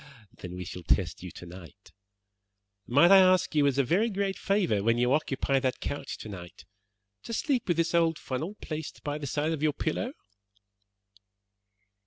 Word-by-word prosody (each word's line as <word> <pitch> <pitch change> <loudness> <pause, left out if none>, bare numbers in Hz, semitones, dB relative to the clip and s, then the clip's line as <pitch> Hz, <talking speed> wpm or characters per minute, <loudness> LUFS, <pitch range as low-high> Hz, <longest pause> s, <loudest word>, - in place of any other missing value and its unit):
"Then 90 -1 -8
we 90 0 -6
shall 90 - -7
test - - 0
you - - -7
tonight. 90 -1 -12 1.0
Might 145 +9 +5
I 195 - +10
ask 185 -1 +4
you 145 -2 +4
as 140 -1 +1
a 140 - +4
very 185 - +2
great 195 -1 -1
favour, 185 - +1
when 115 +2 +2
you 125 +2 +2
occupy 135 -2 +1
that 130 -1 -1
couch 145 - -5
tonight, 90 -6 -10 0.6
to 230 - -7
sleep 255 0 0
with 175 -3 +1
this 165 0 +1
old 165 -2 +3
funnel 155 +10 -4
placed 155 -1 -6
by 145 0 -3
the 145 - -5
side 150 +4 -1
of 160 -3 -3
your 155 -1 +2
pillow?" 165 - -2
150 Hz, 170 wpm, -28 LUFS, 125-180 Hz, 1.0 s, I